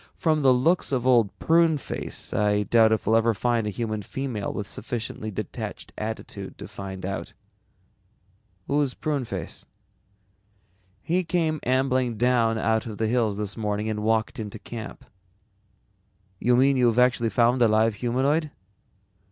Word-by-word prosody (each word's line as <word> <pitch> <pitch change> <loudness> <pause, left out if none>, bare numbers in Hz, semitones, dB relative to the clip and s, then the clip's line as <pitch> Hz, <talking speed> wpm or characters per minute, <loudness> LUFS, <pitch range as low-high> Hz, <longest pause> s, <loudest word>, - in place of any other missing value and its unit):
"From 155 -2 +1
the 135 -2 +5
looks 145 +9 +2
of 125 -2 0
Old 120 -5 +4
Pruneface 165 -3 0
I 105 0 +2
doubt 110 +1 +4
if 110 - 0
we'll 110 - +3
ever 115 0 +2
find 115 +1 0
a - - 0
human 110 0 -3
female 120 0 -4
with 105 - -4
sufficiently 110 +1 -5
detached 105 -1 -6
attitude 110 +1 -6
to - - -8
find 95 -1 -7
out." 95 +1 -5 1.3
"Who's 145 -2 0
Pruneface?" 125 - -4 1.4
"He 180 +3 +1
came 165 -3 0
ambling 130 -2 +1
down 115 -1 +2
out 110 0 0
of 105 -2 -6
the 110 - 0
hills 110 -3 +1
this 105 -2 -3
morning 105 -1 -2
and 105 - -3
walked 110 +1 0
into 105 -2 -5
camp." 115 -2 -8 1.3
"You 125 0 +3
mean 135 +2 +4
you've 120 -2 +3
actually 125 -2 +3
found 120 +2 +2
a 120 - +6
live 110 +1 +3
humanoid?" 135 +8 0
115 Hz, 145 wpm, -25 LUFS, 110-130 Hz, 1.4 s, a